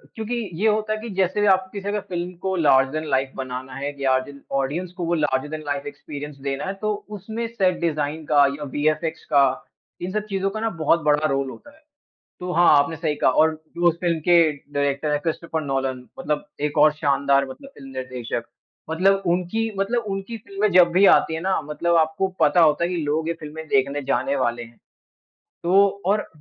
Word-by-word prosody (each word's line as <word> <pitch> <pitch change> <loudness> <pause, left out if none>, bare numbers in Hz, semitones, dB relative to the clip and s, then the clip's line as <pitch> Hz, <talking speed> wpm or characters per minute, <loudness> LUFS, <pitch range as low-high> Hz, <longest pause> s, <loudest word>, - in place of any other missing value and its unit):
क्योंकि 225 +2 -3 0.3
ये 220 - +4
होता 215 0 +1
है 215 - -4
कि 230 - -6
जैसे 195 +2 +1
आप 190 -1 +3
किसी 200 0 -4
का 210 - -1
फिल्म 175 0 -3
को 190 0 -1
लार्जर 135 -5 +4
दैन 155 0 -3
लाइफ़ 135 0 +1
बनाना 130 0 -6
है 140 +1 -4
या 130 -1 +3
जिन 140 -1 -12
ऑडियंस 145 +7 -2
को 175 - -2
वो 170 - 0
लार्जर 150 -2 0
दैन 155 0 -5
लाइफ़ 145 0 -3
एक्सपीरियंस 145 0 -8
देना 135 +3 -2
है 190 - -2
तो 215 0 0 0.2
उसमे 220 +4 -4
सेट 190 -6 +1
डिजाइन 155 -1 -1
का 145 -2 +5
या 150 - -6
विएफएक्स 155 +2 0
का 140 -1 +7 0.6
इन 180 +1 -3
सब 210 +1 -2
चीज़ों 195 0 0
का 215 +2 -5
ना 225 0 0
बहुत 165 +2 +3
बड़ा 150 +1 +3
रोल 135 -1 -1
होता 290 - -12
है। 315 - -25 0.6
तो 180 0 -4
हाँ, 175 0 +4
आपने 145 +3 +1
सही 155 -2 -1
कहा। - - +3
और 160 +4 +3 0.2
जो 175 0 +4
उस 170 - 0
फ़िल्म 170 -2 +1
के 175 +2 +4 0.4
डायरेक्टर 140 +1 0
हैं, 150 0 +1
क्रिस्टोफ़र 165 0 -3
नोलन, 135 -2 -2
मतलब 150 0 -2 0.2
एक 145 - -5
और 150 0 +6
शानदार 140 -2 +2
मतलब 270 - -10
फ़िल्म 135 -1 -11
निर्देशक। 125 -2 -4 0.5
मतलब 195 +4 +3
उनकी 185 +6 0
मतलब 230 +4 0
उनकी 195 +4 -5
फ़िल्में 200 0 -1
जब 180 -1 +7
भी 190 +3 +5
आती 160 - -1
हैं 160 - -3
ना, 190 -1 0
मतलब 170 +4 -1
आपको 160 +4 +2
पता 150 +4 +4
होता 160 +1 +4
है 175 - -1
कि 180 - -2
लोग 155 +2 -1
ये 170 - 0
फ़िल्में 155 +1 -8
देखने 140 +1 +1
जाने 275 - 0
वाले 120 - -1
हैं। 115 0 -14 0.8
तो 195 +3 +5 0.2
और 210 +2 +1
160 Hz, 205 wpm, -23 LUFS, 140-190 Hz, 0.8 s, का